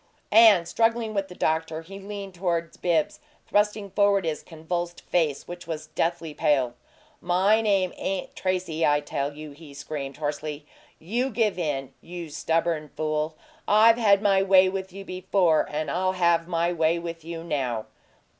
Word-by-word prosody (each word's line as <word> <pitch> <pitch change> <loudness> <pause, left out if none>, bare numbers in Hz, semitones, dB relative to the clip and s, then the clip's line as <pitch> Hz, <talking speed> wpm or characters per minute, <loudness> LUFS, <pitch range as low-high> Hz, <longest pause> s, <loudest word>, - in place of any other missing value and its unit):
And, 210 -6 +7
struggling 225 +1 +1
with 195 -2 -1
the 180 - -11
doctor, 160 0 -1
he 195 +4 -10
leaned 200 -1 -7
toward 170 -2 -2
Bibbs, 165 -3 +1 0.3
thrusting 210 -1 +1
forward 200 -1 +3
his 155 -2 -2
convulsed 175 +1 -5
face, 155 -5 0
which 175 -1 -8
was 155 -2 -5
deathly 165 -2 -1
pale. 135 -5 +1 0.5
"My 190 +5 +3
name 195 -4 +1
ain't 190 -1 -3
Tracy, 180 -4 -1
I 145 -1 +3
tell 140 -1 -3
you!" 150 0 -9
he 145 -1 -13
screamed, 140 -1 -6
hoarsely. 150 0 -4 0.3
"You 235 +10 -1
give 215 -5 0
in, 135 -5 -2
you 170 -2 -8
stubborn 160 0 -1
fool! 155 0 -1 0.3
I've 225 +2 +6
had 205 -3 +4
my 195 -2 +4
way 190 -1 +5
with 190 0 -5
you 195 +1 -9
before, 185 -3 +1
and 155 +1 -3
I'll 185 +2 0
have 170 -2 +2
my 170 0 0
way 165 0 +2
with 170 -1 -6
you 165 0 -6
now!" 130 -9 -2
170 Hz, 160 wpm, -25 LUFS, 155-195 Hz, 0.5 s, And